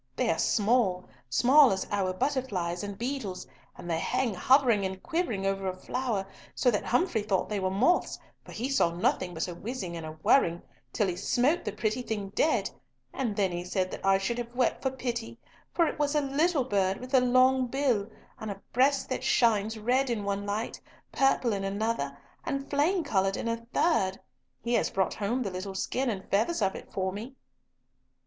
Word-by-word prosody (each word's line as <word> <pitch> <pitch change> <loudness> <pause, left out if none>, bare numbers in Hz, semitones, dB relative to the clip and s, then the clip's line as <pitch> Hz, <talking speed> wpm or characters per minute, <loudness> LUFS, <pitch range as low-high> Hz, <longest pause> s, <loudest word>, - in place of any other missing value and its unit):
They - - +1
are 165 - -1
small, 210 -4 +2 0.2
small 260 - +6
as 190 0 -1
our 195 -2 0
butterflies 200 -7 -2
and 200 -1 -5
beetles, 235 -6 -4 0.3
and - - -9
they 165 -1 0
hang 235 +5 0
hovering 240 +1 +4
and 190 0 -4
quivering 245 - -1
over 195 0 -1
a 185 - -2
flower 225 -1 -2 0.3
so 250 - +3
that 205 - -1
Humfrey 250 - +1
thought 200 -3 0
they 210 -1 -1
were 190 -1 0
moths, 240 - +2 0.3
for - - -13
he 240 +4 -3
saw 275 -10 +3
nothing 175 +1 -1
but 160 - -2
a 175 - -5
whizzing 190 -2 -5
and 165 - -6
a 155 0 -6
whirring 175 -11 +3 0.3
till 210 - +1
he 180 - -2
smote 250 - +1
the 210 - -3
pretty 215 +3 -1
thing 210 -5 -4
dead, 305 +10 +1 0.4
and 235 -6 -2
then 195 -3 +1
he 175 0 -3
said 185 +1 -1
that - - -7
I 195 0 +4
should 215 +5 -2
have 240 0 -6
wept 250 -1 +1
for 265 - +1
pity, 240 -3 -4 0.3
for 340 - +3
it 315 - -3
was 295 0 +1
a 300 - +3
little 290 +2 +1
bird 195 -5 +1
with 255 +2 -10
a 260 - +6
long 255 +1 +4
bill, 245 -5 0 0.3
and 220 - -5
a 200 -1 -6
breast 270 +3 +3
that 260 - -2
shines 220 -2 +2
red 250 +5 +1
in 225 -4 -1
one 200 0 -2
light, 210 +3 -3 0.3
purple 270 -4 +2
in 195 -1 -2
another, 195 -8 -2 0.3
and 275 0 -3
flame 325 +6 +2
coloured 195 -7 +1
in - - -3
a 230 0 -3
third. 195 - +1 0.4
He 235 +1 -1
has - - +2
brought 190 -1 0
home 230 +5 -1
the 195 - -3
little 190 +1 -5
skin 255 +6 -1
and 195 -4 -4
feathers 220 +6 +1
of 195 - +1
it - - -10
for 190 -1 -1
me." 230 +7 -7
220 Hz, 200 wpm, -28 LUFS, 195-260 Hz, 0.4 s, small